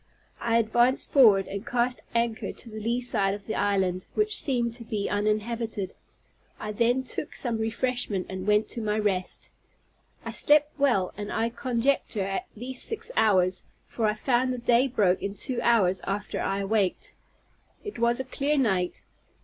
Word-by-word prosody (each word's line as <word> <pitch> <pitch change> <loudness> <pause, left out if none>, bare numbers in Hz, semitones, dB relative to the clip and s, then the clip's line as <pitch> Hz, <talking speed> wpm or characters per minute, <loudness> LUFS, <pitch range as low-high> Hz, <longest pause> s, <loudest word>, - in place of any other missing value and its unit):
I 230 -1 +1
advanced 240 +3 +2
forward, 215 -9 +6
and 200 +1 -5
cast 245 +1 -1
anchor 230 -1 0
on - - -5
the 220 -2 -8
lee 235 +3 -1
side 200 -5 +1
of 205 -1 -11
the 220 - -3
island, 190 -3 0
which 425 0 +1
seemed 240 -4 0
to 235 0 -7
be 215 -3 -3
uninhabited. 215 0 -1 0.7
I 210 - -4
then 240 +4 +1
took 290 - -3
some 235 -3 -1
refreshment 225 -3 -1
and 190 +1 -6
went 210 +1 +3
to 235 - -4
my 210 -1 0
rest. 195 -4 -1 0.7
I - - -3
slept 300 0 +3
well, 240 -10 +2
and 205 0 -5
I 225 +1 0
conjecture 235 -3 0
at 195 0 -3
least 250 +3 -2
six 450 +2 0
hours, 185 -4 +3 0.2
for 225 -2 -1
I 210 - +1
found 250 +3 +1
the 250 - -2
day 240 +2 +3
broke 205 -8 +2
in 200 0 -4
two 245 +2 -1
hours 195 -7 +3
after 205 +1 -3
I 195 +1 -1
awaked. 200 -2 -1 0.7
It 415 - -7
was 235 +1 +2
a - - -1
clear 280 +3 -1
night. 190 -9 0
225 Hz, 170 wpm, -27 LUFS, 200-245 Hz, 0.7 s, forward